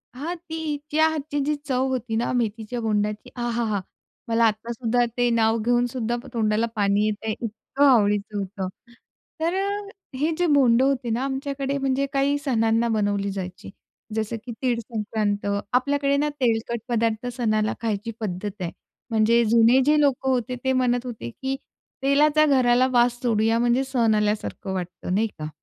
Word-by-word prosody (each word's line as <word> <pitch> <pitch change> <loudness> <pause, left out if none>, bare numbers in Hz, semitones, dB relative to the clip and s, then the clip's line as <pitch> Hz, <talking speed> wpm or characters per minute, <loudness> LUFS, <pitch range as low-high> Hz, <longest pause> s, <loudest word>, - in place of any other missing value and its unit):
हां, 315 +7 -4
तीच्या 315 -2 -1
हातची 300 -2 -3
जी 300 +1 +1
चव 260 -2 +1
होती 245 -3 -2
ना 235 +2 0
मेथीच्या 225 0 -2
बोंडाची. 210 -1 -1
आहाहा! 235 -4 -1 0.5
मला 230 0 +3
आत्तासुद्धा 230 +2 0
ते 245 0 +3
नाव 225 -1 +2
घेऊनसुद्धा 240 0 0 0.2
तोंडाला 220 -1 +1
पाणी 205 0 +2
येतंय. 215 +1 -2
इतकं 230 +5 -1
आवडीचं 210 -5 +3
होतं. 195 -1 -4 0.7
तर 335 +2 +1
अ, 390 +1 0 0.5
हे 305 +5 +1
जे 355 - +2
बोंड 250 -4 +5
होते 265 -2 +1
ना, 230 +3 0
आमच्याकडे 275 0 -2
म्हणजे 270 0 0
काही 280 +1 +2
सणांना 225 -2 +2
बनवली 205 -2 0
जायची. 185 -2 -6 0.5
जसं 220 +1 -1
की 245 - -5
तीळ 245 -3 +1
संक्रांत. 210 -3 -2 0.3
आपल्याकडे 280 +2 +2
ना 295 +1 +1
तेलकट 235 -1 0
पदार्थ 230 0 0
सणाला 215 -3 +1
खायची 225 0 -2
पद्धत 205 -1 -3
आहे. 170 -2 -2 0.4
म्हणजे 230 +1 +3
जुने 230 +3 +5
जे 300 +1 +4
लोकं 270 -2 +2
होते 250 -1 0
ते 265 0 +2
म्हणत 250 -1 +1
होते, 225 - -6
की 265 - -4 0.5
तेलाचा 295 +2 +4
घराला 255 -3 +4
वास 240 0 +3
सोडूया 225 -1 +2
म्हणजे 240 +2 +2
सण 240 -5 +2
आल्यासारखं 210 -2 -1
वाटतं 180 0 -4
नाही 220 +3 +2
का. 155 0 -4
235 Hz, 150 wpm, -24 LUFS, 215-265 Hz, 0.7 s, बोंड